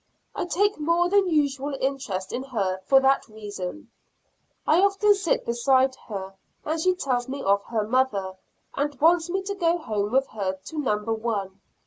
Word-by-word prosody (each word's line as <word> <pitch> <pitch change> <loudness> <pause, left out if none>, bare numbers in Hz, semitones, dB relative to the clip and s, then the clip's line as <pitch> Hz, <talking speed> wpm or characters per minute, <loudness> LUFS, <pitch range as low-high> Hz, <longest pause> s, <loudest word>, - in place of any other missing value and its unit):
I - - -3
take 405 +2 +1
more 335 +3 +2
than 395 -1 +3
usual 285 -3 0
interest 250 -9 -3
in 255 - -2
her 200 -8 -2
for 270 - +7
that 270 +1 +2
reason. 210 +3 -7 0.7
I 325 +4 +4
often 400 +1 +4
sit 390 -4 -1
beside 260 +2 +2
her 195 -3 -6 0.3
and 315 +1 -1
she 370 +2 +2
tells 255 -7 -1
me 275 +1 -4
of 200 +1 +2
her 220 -3 -2
mother, 220 -6 +1 0.4
and 290 +1 -2
wants 335 +2 +4
me 380 +2 -1
to 400 +1 -3
go 345 -3 +1
home 210 -9 -2
with 265 +2 +3
her 195 -3 -2
to 190 +12 -8
number 225 -5 0
one. 205 -4 -3
265 Hz, 170 wpm, -25 LUFS, 210-330 Hz, 0.7 s, for